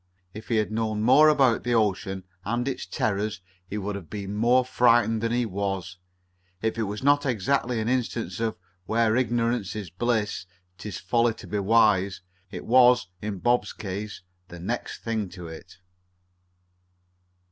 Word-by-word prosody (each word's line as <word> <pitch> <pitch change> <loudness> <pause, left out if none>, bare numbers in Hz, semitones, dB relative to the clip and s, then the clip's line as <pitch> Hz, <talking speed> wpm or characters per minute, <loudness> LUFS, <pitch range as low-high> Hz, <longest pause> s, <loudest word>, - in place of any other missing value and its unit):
If 110 +1 -9
he 115 - 0
had 110 -1 +1
known 110 -1 -1
more 150 +6 +7
about 135 -6 +3
the 120 0 +1
ocean 95 -3 0 0.2
and 120 +5 -1
its 135 - -3
terrors 110 -4 -1 0.3
he 100 - -4
would 105 0 -3
have 100 -5 -8
been 100 -1 -5
more 120 +4 +3
frightened 120 -3 +3
than 115 0 0
he 120 0 +1
was. 95 -3 -3 0.6
If 110 +2 -2
it 110 -3 -1
was 105 +4 -5
not 145 +1 +4
exactly 125 0 0
an 110 - -2
instance 120 -2 -1
of 115 -1 -1 0.3
"where 115 0 +2
ignorance 120 -4 0
is 100 -6 -6
bliss, 105 -1 -1 0.3
'tis 100 -1 -6
folly 115 -1 +1
to - - -11
be 105 - -2
wise," 100 -2 +3 0.3
it - - -7
was, 125 -4 +5
in 105 -2 -4
Bob's 120 +6 +1
case, 100 0 -6 0.2
the 85 -1 -10
next 85 - -4
thing 110 -4 -2
to 90 -2 -9
it. 80 +1 -11
110 Hz, 160 wpm, -26 LUFS, 100-120 Hz, 0.6 s, more